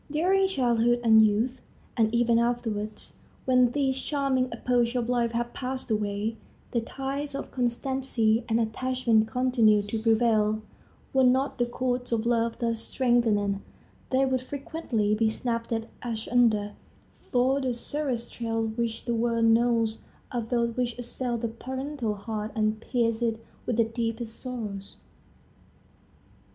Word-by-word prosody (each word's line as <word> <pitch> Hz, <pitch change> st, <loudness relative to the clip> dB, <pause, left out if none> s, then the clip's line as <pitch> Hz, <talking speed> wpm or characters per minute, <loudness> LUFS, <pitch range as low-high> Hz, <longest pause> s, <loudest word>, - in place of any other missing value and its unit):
During 370 Hz, +6 st, +3 dB
childhood 240 Hz, -7 st, +2 dB
and 220 Hz, -1 st, +7 dB
youth, 220 Hz, +5 st, +2 dB, 0.3 s
and 220 Hz, -2 st, +2 dB
even 235 Hz, 0 st, +3 dB
afterwards, 225 Hz, -3 st, -2 dB, 0.3 s
when 255 Hz, -1 st, +5 dB
these 265 Hz, -1 st, 0 dB
charming 270 Hz, -3 st, 0 dB
epochs 245 Hz, -1 st, +1 dB
of 240 Hz, -2 st, 0 dB
life 240 Hz, -2 st, +1 dB
have 240 Hz, +1 st, -2 dB
passed 255 Hz, -2 st, -4 dB
away, 210 Hz, +1 st, -1 dB, 0.3 s
the 235 Hz, -, +1 dB
ties 275 Hz, +4 st, -4 dB
of 275 Hz, -, -5 dB
constancy 245 Hz, -2 st, 0 dB
and 225 Hz, +1 st, +2 dB
attachment 230 Hz, -1 st, +1 dB
continue 230 Hz, -4 st, +3 dB
to 215 Hz, +2 st, -3 dB
prevail. 220 Hz, -1 st, +2 dB, 0.5 s
Were 265 Hz, -1 st, +4 dB
not 260 Hz, +2 st, +2 dB
the 240 Hz, -, +2 dB
chords 245 Hz, 0 st, -2 dB
of 230 Hz, -1 st, 0 dB
love 230 Hz, -1 st, +1 dB
thus 230 Hz, -1 st, -1 dB
strengthened, 225 Hz, -5 st, +1 dB, 0.5 s
they 265 Hz, +1 st, +3 dB
would 260 Hz, -1 st, 0 dB
frequently 255 Hz, -6 st, -2 dB
be 220 Hz, +1 st, +2 dB
snapped 230 Hz, +1 st, -2 dB, 0.3 s
asunder; 225 Hz, -2 st, +1 dB, 0.5 s
for 260 Hz, +3 st, +1 dB
the 260 Hz, -1 st, 0 dB
severest 245 Hz, -1 st, -3 dB
trials 225 Hz, -1 st, -2 dB
which 230 Hz, -1 st, -2 dB
the 240 Hz, -, 0 dB
world 230 Hz, 0 st, +1 dB
knows 230 Hz, -1 st, +3 dB, 0.3 s
are 245 Hz, -, -1 dB
those 235 Hz, 0 st, -1 dB
which 245 Hz, -1 st, -1 dB
assail 245 Hz, 0 st, -3 dB
the 230 Hz, 0 st, -2 dB
parental 260 Hz, 0 st, -4 dB
heart 215 Hz, +1 st, -4 dB
and 215 Hz, 0 st, 0 dB
pierce 230 Hz, -2 st, 0 dB
it 225 Hz, -2 st, 0 dB, 0.3 s
with 240 Hz, -, 0 dB
the 230 Hz, -, +5 dB
deepest 225 Hz, 0 st, -3 dB
sorrows. 215 Hz, -6 st, -5 dB
235 Hz, 140 wpm, -27 LUFS, 225-255 Hz, 0.5 s, and